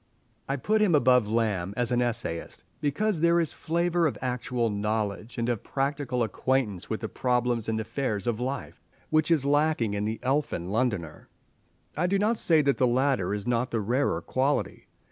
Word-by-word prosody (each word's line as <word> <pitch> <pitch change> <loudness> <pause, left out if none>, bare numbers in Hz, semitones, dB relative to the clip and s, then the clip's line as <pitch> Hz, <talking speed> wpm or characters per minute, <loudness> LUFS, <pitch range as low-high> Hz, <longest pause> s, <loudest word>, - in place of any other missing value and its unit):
I 135 - +1
put 215 +10 +1
him 190 -7 +4
above 125 -5 +4
Lamb 105 -4 -1
as 120 0 +1
an 125 0 +2
essayist, 115 -9 -2 0.2
because 160 +5 0
there 170 0 +4
is 165 -3 -1
a - - -19
flavour 170 +1 +1
of 145 - -3
actual 125 -2 -1
knowledge 105 +2 -2
and 115 0 -1
of 120 -4 -1
practical 135 -3 -1
acquaintance 110 -3 -1
with 110 - -3
the 110 - -2
problems 125 -2 0
and 110 0 0
affairs 110 -3 -2
of 120 -2 -1
life, 130 0 -4 0.3
which 155 0 +3
is 155 -5 +3
lacking 145 -6 +2
in 105 0 -1
the 110 +1 -3
elfin 130 - -1
Londoner. 105 -9 -2 0.7
I 175 +4 +1
do 200 +2 +2
not 215 +3 +1
say 160 -3 +4
that 140 -1 +2
the 125 - +4
latter 125 -6 +1
is 105 0 -3
not 120 +1 0
the 115 - -1
rarer 110 -5 0
quality. 135 - -1
125 Hz, 185 wpm, -27 LUFS, 110-145 Hz, 0.7 s, him